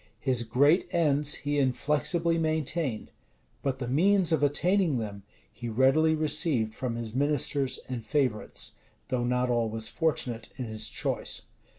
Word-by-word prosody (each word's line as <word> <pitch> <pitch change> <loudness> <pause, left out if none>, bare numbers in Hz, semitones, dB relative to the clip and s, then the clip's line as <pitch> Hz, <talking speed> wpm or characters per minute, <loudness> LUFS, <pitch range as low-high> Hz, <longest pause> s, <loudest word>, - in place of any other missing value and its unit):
His 130 -3 +1
great 140 - +3
ends 150 -3 +2
he 145 0 -1
inflexibly 150 +5 +1
maintained; 155 -5 -1 0.5
but 135 -2 -1
the 125 -2 -4
means 180 +7 +3
of 160 - +2
attaining 165 +2 +2
them 105 -3 -5 0.3
he 120 +2 -6
readily 135 +7 +3
received 150 -7 0
from 120 0 -3
his 115 -2 -5
ministers 140 0 +1
and 125 -3 -5
favorites, 130 -7 -1 0.4
though 125 -2 0
not 125 0 +1
always 115 -2 0
fortunate 125 -8 -2
in 130 - -4
his 110 -1 -1
choice. - - -1
135 Hz, 135 wpm, -28 LUFS, 120-155 Hz, 0.5 s, great